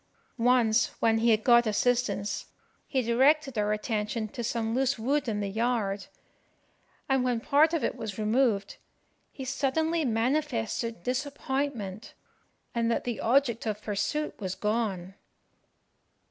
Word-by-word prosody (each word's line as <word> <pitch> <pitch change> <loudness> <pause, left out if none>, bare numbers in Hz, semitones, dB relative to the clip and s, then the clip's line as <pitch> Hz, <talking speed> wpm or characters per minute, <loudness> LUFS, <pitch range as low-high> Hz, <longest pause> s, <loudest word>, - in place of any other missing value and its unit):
Once, 240 -1 +3
when 225 -1 +3
he 235 +1 +3
had 220 -1 +3
got 240 -1 +5
assistance, 210 -3 0 0.4
he 260 -2 0
directed 270 +4 +3
our 210 -1 +1
attention 215 +1 -2
to 240 +3 -6
some 225 -1 -1
loose 265 +1 +1
wood 275 +5 0
in 210 -2 -1
the 200 - -2
yard; 210 -2 -1 1.0
and 265 -2 +2
when 245 -2 0
part 295 +6 +4
of 330 -3 -1
it - - 0
was 210 -4 -6
removed, 215 -2 +1 0.5
he 265 - -7
suddenly 310 +5 0
manifested 230 - -1
disappointment, 265 -5 -3 0.6
and 230 -1 0
that 235 - 0
the 240 -2 -3
object 235 -2 +2
of 210 -1 -2
pursuit 220 +9 -2
was 190 -3 -3
gone. 200 -3 -2
235 Hz, 130 wpm, -28 LUFS, 215-265 Hz, 1.0 s, got